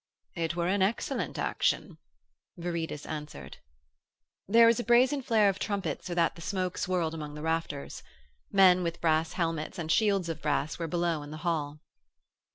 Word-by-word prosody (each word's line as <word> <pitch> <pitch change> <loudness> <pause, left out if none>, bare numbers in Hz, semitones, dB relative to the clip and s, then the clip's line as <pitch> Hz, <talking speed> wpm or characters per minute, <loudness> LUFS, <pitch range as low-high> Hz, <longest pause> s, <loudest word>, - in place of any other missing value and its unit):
'It 165 -1 -2
were 170 -1 -1
an 190 +2 +1
excellent 200 +5 -1
action,' - - -1 0.6
Viridus 170 -3 -4
answered. 150 -1 -7 0.9
There 230 +4 +7
was 230 +1 +4
a - - -1
brazen 250 +4 +4
flare 220 -4 +3
of 195 0 0
trumpets 200 -3 -3
so 175 - -4
that 170 -1 +2
the 170 - -12
smoke 185 0 -2
swirled 175 -3 0
among 150 -2 -6
the 150 - -7
rafters. 160 -3 -3 0.5
Men 185 -2 +6
with 170 -1 -3
brass 160 -1 +1
helmets 165 0 -2
and 160 -2 -2
shields 200 -4 +2
of 165 - -5
brass 150 +1 -1
were 165 - -2
below 170 -1 0
in 145 - -9
the 155 - -7
hall. 150 -3 -2
170 Hz, 165 wpm, -29 LUFS, 160-195 Hz, 0.9 s, There